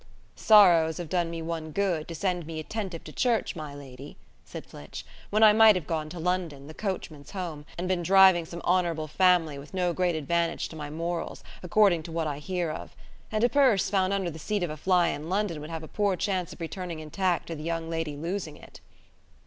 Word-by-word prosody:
"Sorrows 175 Hz, -7 st, +6 dB
have 175 Hz, -3 st, -6 dB
done 175 Hz, -1 st, 0 dB
me 165 Hz, -1 st, -5 dB
one 160 Hz, -1 st, -4 dB
good, 175 Hz, -3 st, -1 dB
to 165 Hz, -, -6 dB
send 175 Hz, -1 st, -2 dB
me 160 Hz, -1 st, -5 dB
attentive 185 Hz, 0 st, -5 dB
to 155 Hz, -, -10 dB
church, 235 Hz, -5 st, 0 dB
my 150 Hz, -3 st, -7 dB
lady," 140 Hz, 0 st, -11 dB, 0.3 s
said -, -, -9 dB
Flitch, 75 Hz, -, -10 dB, 0.2 s
"when 215 Hz, +2 st, +3 dB
I 215 Hz, -1 st, +8 dB
might 220 Hz, -1 st, +7 dB
have 180 Hz, -5 st, -3 dB
gone 155 Hz, 0 st, -3 dB
to 175 Hz, +2 st, -8 dB
London, 170 Hz, -5 st, -2 dB
the 155 Hz, -, -10 dB
coachman's 165 Hz, -7 st, -5 dB
home, 170 Hz, -7 st, -6 dB
and 180 Hz, +1 st, -3 dB
been 185 Hz, -1 st, 0 dB
driving 190 Hz, -1 st, +6 dB
some 170 Hz, +1 st, -8 dB
honourable 170 Hz, -3 st, +1 dB
family, 165 Hz, -3 st, +3 dB
with 145 Hz, +7 st, -11 dB
no 180 Hz, -2 st, +1 dB
great 180 Hz, -1 st, +1 dB
advantage 170 Hz, +2 st, -1 dB
to -, -, -10 dB
my 150 Hz, -2 st, -6 dB
morals, 170 Hz, +2 st, -4 dB, 0.2 s
according 185 Hz, -2 st, +3 dB
to 165 Hz, -, -9 dB
what 165 Hz, 0 st, -1 dB
I 145 Hz, -2 st, -3 dB
hear 175 Hz, 0 st, -2 dB
of. 155 Hz, -, -8 dB, 0.4 s
And 215 Hz, 0 st, 0 dB
a -, -, +6 dB
purse 245 Hz, -8 st, +3 dB
found 190 Hz, -1 st, +2 dB
under 195 Hz, -3 st, -1 dB
the 160 Hz, -, -9 dB
seat 205 Hz, +2 st, -2 dB
of 170 Hz, -, -2 dB
a -, -, -5 dB
fly 180 Hz, +2 st, +2 dB
in 150 Hz, +3 st, -5 dB
London 190 Hz, -5 st, -1 dB
would 150 Hz, -, -8 dB
have 165 Hz, -1 st, -5 dB
a -, -, -8 dB
poor 205 Hz, +1 st, 0 dB
chance 185 Hz, -2 st, -2 dB
of -, -, -11 dB
returning 170 Hz, 0 st, -5 dB
intact 175 Hz, +3 st, -1 dB
to 165 Hz, -, -5 dB
the 150 Hz, -, -8 dB
young 165 Hz, 0 st, -3 dB
lady 165 Hz, -3 st, -3 dB
losing 165 Hz, 0 st, -4 dB
it." -, -, -15 dB
170 Hz, 220 wpm, -27 LUFS, 155-185 Hz, 0.4 s, I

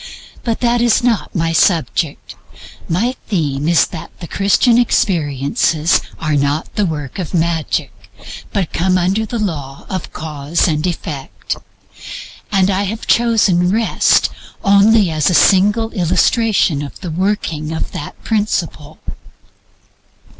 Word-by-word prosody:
But 230 Hz, -3 st, -2 dB
that 240 Hz, -1 st, +2 dB
is 240 Hz, 0 st, +3 dB
not 235 Hz, -4 st, 0 dB
my 165 Hz, -1 st, 0 dB
subject. 165 Hz, -3 st, 0 dB, 0.6 s
My 225 Hz, +10 st, 0 dB
theme 150 Hz, -7 st, -1 dB
is 170 Hz, -1 st, +4 dB
that 160 Hz, -, -8 dB
the 175 Hz, -, -7 dB
Christian 205 Hz, +6 st, +3 dB
experiences 160 Hz, -, +1 dB, 0.2 s
are 155 Hz, -2 st, -1 dB
not 145 Hz, +2 st, -1 dB
the 205 Hz, -2 st, 0 dB
work 150 Hz, -1 st, -5 dB
of 180 Hz, -1 st, -4 dB
magic, 165 Hz, -3 st, -1 dB, 0.6 s
but 195 Hz, -5 st, -2 dB
come 185 Hz, +2 st, +2 dB
under 190 Hz, +5 st, 0 dB
the 235 Hz, -, -3 dB
law 145 Hz, -10 st, -4 dB
of 185 Hz, -, -4 dB
Cause 155 Hz, +2 st, -1 dB
and 155 Hz, +1 st, 0 dB
Effect. 155 Hz, -5 st, -5 dB, 1.0 s
I 195 Hz, -2 st, +3 dB, 0.2 s
have 215 Hz, +3 st, -4 dB
chosen 210 Hz, -7 st, +3 dB
Rest 220 Hz, +3 st, +2 dB, 0.3 s
only 200 Hz, -1 st, +4 dB
as 155 Hz, +1 st, +1 dB
a 180 Hz, -, +1 dB
single 210 Hz, +5 st, +4 dB
illustration 185 Hz, -, +2 dB
of 145 Hz, -, -8 dB
the 180 Hz, -4 st, -5 dB
working 165 Hz, -4 st, -2 dB
of 160 Hz, -, -4 dB
that 145 Hz, -, -7 dB
principle. 175 Hz, -8 st, -2 dB
175 Hz, 125 wpm, -17 LUFS, 155-210 Hz, 1.0 s, is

